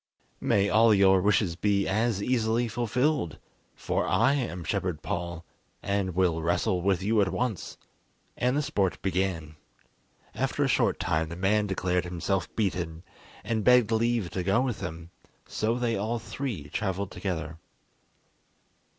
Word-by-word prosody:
"May 100 0 +2
all 110 +1 +5
your 95 -1 +5
wishes 100 -3 +2
be 100 +1 +1
as 110 0 0
easily 120 -1 +1
fulfilled, 120 - 0 0.4
for - - -1
I 140 - +3
am 115 -11 -2
Shepherd 90 -2 -2
Paul, 85 -1 -4 0.4
and 100 -3 -1
will 90 -3 +2
wrestle 85 +2 0
with 95 0 +1
you 105 +1 +3
at 95 - +1
once," 120 -8 -3 0.6
and 125 +3 +1
the 150 - +1
sport 95 -8 0
began. 90 -5 -2 0.8
After - - -1
a - - +2
short - - +1
time 80 0 0
the 85 - -6
man 105 +3 +1
declared 90 -2 0
himself 90 0 -2
beaten, 90 -6 -2 0.4
and 110 -2 -1
begged 125 -2 +5
leave 115 -4 +1
to 95 - -2
go 95 +6 +2
with 125 -6 -2
them; 85 -2 -7 0.4
so 110 +2 -1
they 120 -2 0
all 110 +4 -1
three 115 - -5
travelled 95 +1 -2
together. 85 -4 -4
100 Hz, 145 wpm, -27 LUFS, 90-115 Hz, 0.8 s, all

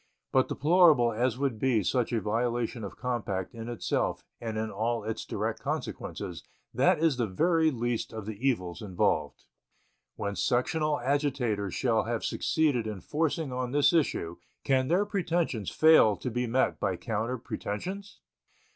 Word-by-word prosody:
But 130 -1 +3
deplorable 150 -7 +4
as 120 +2 0
would 135 -5 -1
be 120 -5 +2
such 125 +4 0
a 115 - +1
violation 115 +2 -1
of 100 - -7
compact 110 -7 -3
in 115 0 -7
itself 120 - -1 0.2
and 110 -2 -4
in 110 0 -2
all 115 0 -1
its 110 +1 -4
direct - - -3
consequences, - - -5 0.3
that - - +4
is 160 -4 +2
the 120 -3 0
very 160 - +2
least 120 -4 -2
of 110 -2 -6
the 110 - -4 0.2
evils 90 -8 -3
involved. 95 -5 -1 0.7
When 100 0 -3
sectional 150 - +1
agitators 125 - 0
shall 115 -4 +1
have 115 0 -2
succeeded 145 -8 +1
in 105 -3 -5
forcing 155 - -1
on 125 0 -3
this 145 +3 +4
issue, 85 - 0 0.3
can 130 -2 +2
their 180 +7 +2
pretensions 170 - -1
fail 155 -10 +6
to 125 - -5
be 125 +1 -1
met 130 +3 +1
by 95 -2 0
counter 115 +3 -2
pretensions? 185 - -6
120 Hz, 155 wpm, -29 LUFS, 110-145 Hz, 0.7 s, fail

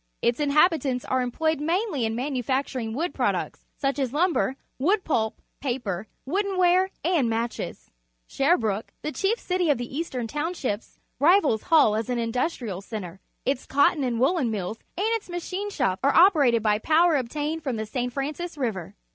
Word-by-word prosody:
Its 235 +3 +2
inhabitants 295 -3 +2
are 260 0 +1
employed 315 +5 0
mainly 330 - 0
in 220 0 -1
manufacturing 260 -2 -2
wood 325 +10 -2
products, - - -2
such 275 0 -1
as 265 -3 0
lum 340 +5 +2
ber, 265 - 0 0.2
wood 375 +8 +2
pulp, 220 -8 0 0.2
paper, 230 -7 -3 0.2
woodenware, 370 +1 +2 0.2
and 325 -9 +2
matches. 230 +1 -4 0.4
Shcrbrookc, 225 - +1 0.2
the 305 - -2
cliief 395 +8 +1
citj^ 360 -7 0
of 285 - +1
the 245 +2 -6
Eastern 265 -7 -3
Townshii)s,rivaIsHull 295 - +1
as 225 - -5
an 245 - 0
industrial 235 - -2
centre. 195 -4 -7 0.3
Its 265 -1 -1
co 285 +1 +5
tton 295 - -4
and 240 -3 -1
woollen 270 -1 +2
mills 215 0 -3 0.2
and 390 - 0
its 450 -4 -2
machine 365 +3 -4
shops 190 - 0
are 280 0 +3
operated 285 - +5
by 210 -1 +2
power 320 +6 +4
obtained 295 +5 -2
from 265 -5 -2
the 220 - -2
*S/. 250 +2 -2
Francis 300 +6 -4
River. 220 - -3
275 Hz, 160 wpm, -25 LUFS, 235-335 Hz, 0.4 s, co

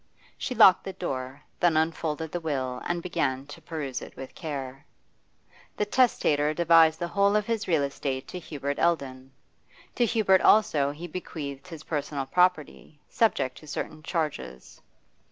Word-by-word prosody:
She 250 - -4
locked 185 -5 +7
the 195 - -6
door, 130 -5 -5 0.2
then 170 -3 +3
unfolded 160 -1 -1
the 175 - -2
will 130 -6 -3
and 175 -1 -2
began 135 -6 -1
to 145 - -11
peruse 150 -6 -5
it - - -10
with 135 0 -9
care. 135 -3 -6 0.9
The 210 - +1
testator 155 - +2
devised 165 -1 +5
the 170 0 -3
whole 200 +2 +2
of 210 -1 +2
his 225 -2 -2
real 160 -5 +2
estate 135 -1 -3
to 180 - -6
Hubert 145 -4 -4
Eldon; 135 -6 -1 0.6
to 240 - +2
Hubert 205 -4 +3
also 150 -10 +4
he 150 +4 -7
bequeathed 155 -3 -7
his 165 -3 -9
personal 145 -3 -3
property, 160 -2 0
subject 130 - +1
to 155 - -15
certain 155 +1 -5
charges. 150 - -4
155 Hz, 155 wpm, -27 LUFS, 140-175 Hz, 0.9 s, locked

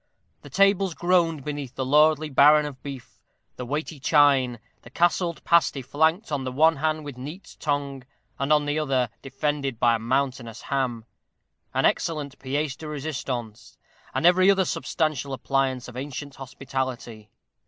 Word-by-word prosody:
The - - -12
tables 195 -3 +2
groaned 170 -4 +1
beneath 145 -4 -5
the 130 - -2
lordly 150 +2 +3
baron 150 +3 +6
of 135 -3 -8
beef, 135 -2 -9 0.4
the 125 - -7
weighty 150 +2 -4
chine, 135 -4 +3 0.2
the - - -14
castled 170 +3 0
pasty 165 -5 +2
flanked 160 - +1
on 140 -2 -1
the 130 - -3
one 160 +4 +4
hand 155 +1 -1
with 140 -4 -8
neat's 155 +8 -9
tongue, 140 -3 -3 0.4
and 140 +2 -1
on 150 -1 +4
the 145 +1 0
other 130 -6 0
defended 140 -2 -3
by 120 -1 +4
a 115 - 0
mountainous 125 -1 -2
ham, 125 -5 -2 0.7
an - - +2
excellent 150 -4 -1
pièce 140 +1 -2
de 155 - -9
résistance, 130 -7 -5 0.3
and - - -1
every 185 +2 +6
other 195 -1 +4
substantial 150 -6 -2
appliance 135 -1 -1
of 125 - -11
ancient 140 +1 -6
hospitality. 130 -5 -5
140 Hz, 155 wpm, -25 LUFS, 130-155 Hz, 0.7 s, baron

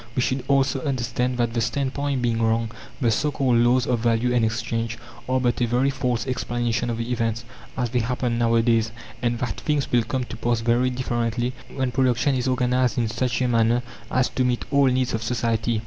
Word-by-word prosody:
We 125 - +1
should 130 0 -1
also 135 -1 +2
understand 125 -2 -1
that 120 -2 0
the 120 - 0
standpoint 135 +2 -1
being 115 -1 +1
wrong, 115 0 +1 0.3
the 120 -5 +2
so 145 +7 +1
called 130 -4 +1
"laws" 120 +1 +3
of 120 -2 0
value 120 +1 +1
and 120 -2 +3
exchange 115 +1 -2 0.3
are 130 0 +2
but 125 -1 0
a 120 - +3
very 125 +4 +2
false 125 -4 -1
explanation 120 -2 -1
of 115 -1 -2
events, 115 -1 -2 0.3
as 120 -3 -1
they 125 - +1
happen 120 0 -1
nowadays; 115 -1 +2 0.3
and 120 -1 0
that 120 -5 -3
things 150 -3 -1
will 120 - +4
come 130 +3 -2
to - - -8
pass 120 -1 0
very 120 +2 +2
differently 120 -1 -1 0.2
when 130 -2 0
production 130 +1 +2
is 125 -1 -1
organized 125 -1 +1
in 115 -2 +1
such 125 +2 -1
a - - +2
manner 115 0 +2 0.3
as 130 0 +2
to 130 - -1
meet 125 -1 0
all 140 -1 +4
needs 130 -1 +1
of 115 - -1
society. 115 -1 0
120 Hz, 200 wpm, -24 LUFS, 115-130 Hz, 0.3 s, will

